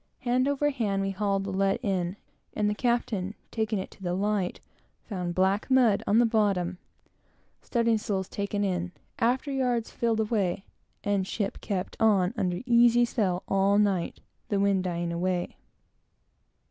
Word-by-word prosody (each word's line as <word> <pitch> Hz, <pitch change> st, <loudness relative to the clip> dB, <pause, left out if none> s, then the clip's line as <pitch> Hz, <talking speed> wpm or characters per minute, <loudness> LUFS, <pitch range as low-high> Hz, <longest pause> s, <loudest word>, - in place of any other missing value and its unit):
Hand 255 Hz, +1 st, +1 dB
over 285 Hz, +1 st, +1 dB
hand, 205 Hz, -7 st, -1 dB
we 195 Hz, -, -1 dB
hauled 195 Hz, 0 st, 0 dB
the 195 Hz, -, -4 dB
lead 195 Hz, +3 st, +1 dB
in, 185 Hz, -4 st, -1 dB, 0.4 s
and 210 Hz, -1 st, +1 dB
the 210 Hz, -, +1 dB
captain, 215 Hz, -4 st, -1 dB, 0.2 s
taking 220 Hz, -1 st, -1 dB
it 190 Hz, -, -5 dB
to -, -, -18 dB
the 175 Hz, -1 st, -1 dB
light, 200 Hz, -1 st, -1 dB, 0.4 s
found 180 Hz, -4 st, -4 dB
black 190 Hz, +4 st, +1 dB
mud 250 Hz, -6 st, +4 dB
on 210 Hz, -, +4 dB
the 240 Hz, -, +6 dB
bottom. 195 Hz, -5 st, +1 dB, 0.8 s
Studding 230 Hz, -2 st, +1 dB
sails 195 Hz, -4 st, -2 dB
taken 205 Hz, 0 st, -2 dB
in; 180 Hz, -2 st, -1 dB, 0.3 s
after 255 Hz, +4 st, +1 dB
yards 250 Hz, -4 st, 0 dB
filled, 225 Hz, -1 st, 0 dB, 0.7 s
and 200 Hz, -2 st, 0 dB
ship 200 Hz, -1 st, -3 dB
kept 190 Hz, -3 st, -3 dB
on 200 Hz, -3 st, +3 dB
under 180 Hz, -5 st, -1 dB
easy 240 Hz, 0 st, +5 dB
sail 190 Hz, -6 st, -1 dB
all 195 Hz, +1 st, +3 dB
night; 200 Hz, -4 st, +1 dB, 0.3 s
the 200 Hz, -, +1 dB
wind 195 Hz, -2 st, +2 dB
dying 170 Hz, -1 st, -2 dB
away. 180 Hz, +1 st, -1 dB
200 Hz, 150 wpm, -27 LUFS, 190-230 Hz, 0.8 s, the